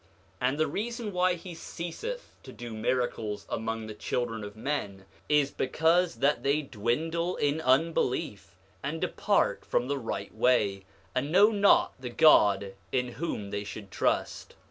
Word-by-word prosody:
9:20 125 - +3
And 140 - -3
the 155 - +2
reason 230 0 -3
why 180 0 +2
he 175 +1 -9
ceaseth 175 - -6
to - - -11
do 120 -1 -8
miracles 110 -2 -1
among 110 0 -3
the 110 - -7
children 115 0 -3
of 105 0 -8
men 105 -6 -3 0.2
is 145 -2 +3
because 170 +2 +2
that 140 +2 +2
they 145 +2 +1
dwindle 160 - -1
in 145 +2 0
unbelief, 130 - 0 0.3
and 150 +4 -3
depart - - +1
from 125 - 0
the 140 0 -1
right 115 - -5
way, 105 -5 +2 0.3
and 130 +3 -1
know 200 +5 +6
not 205 -2 +4
the 125 - -4
God 100 -8 +5 0.2
in 125 -1 0
whom 120 -7 -4
they 100 0 -2
should 100 -1 -8
trust. - - -1
135 Hz, 155 wpm, -29 LUFS, 110-165 Hz, 0.3 s, know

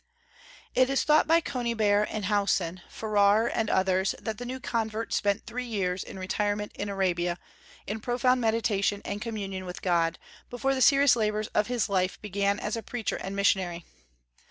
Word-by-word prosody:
It 255 0 +3
is 275 - +1
thought 305 0 +4
by 330 +1 +5
Conybeare 220 -7 +1
and 215 -2 -3
Howson, 185 -3 0
Farrar 210 0 +3
and 225 -2 -1
others 190 0 +2
that 220 -1 -5
the 245 - -5
new 260 +1 -5
convert 225 -2 -2
spent 200 -1 0
three 250 +2 -5
years 190 -5 -1
in - - -10
retirement 205 +2 -2
in 205 - -4
Arabia, 180 -3 0 0.5
in 215 +2 -4
profound 250 +2 +1
meditation 215 -3 +1
and 205 +1 -4
communion 200 -5 -4
with 180 -1 -8
God, 170 -2 +1 0.3
before 270 +3 0
the 260 - -1
serious 275 0 +6
labors 215 -1 -1
of 210 - +1
his 245 -3 0
life 185 -2 0
began 200 0 -1
as 210 - -2
a 230 - -4
preacher 230 +1 -3
and 195 +1 -5
missionary. 185 -4 +1
210 Hz, 170 wpm, -28 LUFS, 195-235 Hz, 0.5 s, serious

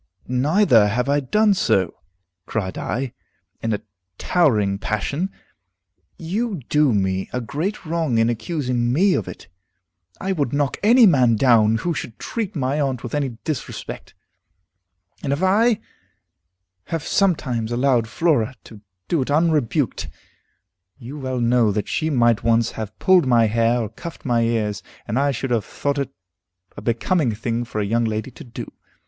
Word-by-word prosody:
"Neither 125 - +4
have 125 +5 -1
I 145 +1 +2
done 210 +10 +3
so," 95 - +1 0.5
cried 100 -4 -3
I, 130 0 -3 0.5
in 115 - -1
a 105 - -1 0.4
towering 105 - +2
passion. 140 - -2 0.9
"You 195 +2 -3
do 150 -3 +3
me 95 -2 0
a 125 - -2
great 160 - -4
wrong 160 -6 0
in 115 0 +3
accusing 120 0 -1
me 185 +8 +3
of - - -1
it. 90 - -9 0.7
I 190 - -2
would 145 -9 -1
knock 145 -1 0
any 235 +3 +6
man 130 - +4
down 110 -2 +4
who 170 +8 -1
should 125 -6 -6
treat 215 -4 -4
my 140 0 -1
aunt 130 -3 -1
with 120 - -6
any 135 -6 -2
disrespect. 155 -3 -6 1.1
And 140 - -2
if 140 +6 -1
I 215 +4 +3 1.1
have 165 -2 -3
sometimes 130 - 0
allowed 120 -2 +2
Flora 130 -3 +1
to 110 -3 -13 0.3
do 165 - +1
it 130 - -3
unrebuked, 150 -4 +1 0.9
you 135 +3 -8
well 130 -2 -3
know 120 -2 +3
that 100 -1 -2
she 160 - -1
might 120 -5 +2
once 115 0 +2
have 110 -3 -7
pulled 185 -6 +4
my 120 -2 +4
hair, 115 +2 +2
or 110 - -3
cuffed 170 +9 -10
my 120 -3 +2
ears, 110 -3 0 0.3
and 115 +5 0
I 140 +1 +2
should 135 -1 -3
have 115 -3 +1
thought 140 0 -2
it 140 -2 -2 0.7
a - - -8
becoming 120 - 0
thing 120 +2 -2
for 110 -3 -5
a 105 - 0
young 115 +3 +1
lady 110 +3 -3
to 140 - -12
do. 120 -4 -8
125 Hz, 160 wpm, -22 LUFS, 115-155 Hz, 1.1 s, any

